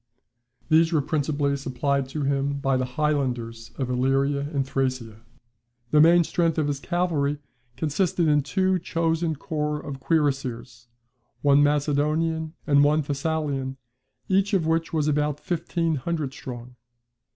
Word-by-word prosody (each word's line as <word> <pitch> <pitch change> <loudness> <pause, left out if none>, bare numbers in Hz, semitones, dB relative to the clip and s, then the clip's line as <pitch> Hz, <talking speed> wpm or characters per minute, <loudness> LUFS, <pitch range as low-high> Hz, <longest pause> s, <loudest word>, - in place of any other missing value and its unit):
These 160 +1 +4
were 155 -3 +2
principally 145 -1 0
supplied 135 0 -1
to 150 +2 -3
him 140 0 0
by 135 -1 0
the 130 0 0
highlanders 125 -7 -1
of 130 - -2
Illyria 135 +3 +1
and 140 -4 0
Thracia. 130 -5 -2 0.7
The 150 - +6
main 170 +2 +6
strength 165 0 0
of 155 - +2
his 145 -1 -2
cavalry 155 -4 0 0.4
consisted 160 +3 0
in 150 -1 +4
two 185 +5 +1
chosen 165 -1 -1
corps 150 0 -2
of 140 -3 -7
cuirassiers, 130 -6 -1 0.6
one 140 0 +5
Macedonian, 150 +2 +1
and 140 -1 +5
one 150 +2 +3
Thessalian 140 -2 -2 0.5
each 195 +2 +2
of 175 -4 +1
which 165 +1 0
was 155 -2 0
about 150 -1 0
fifteen 165 0 -1
hundred 150 0 -3
strong. 125 -2 -9
145 Hz, 135 wpm, -25 LUFS, 135-160 Hz, 0.7 s, The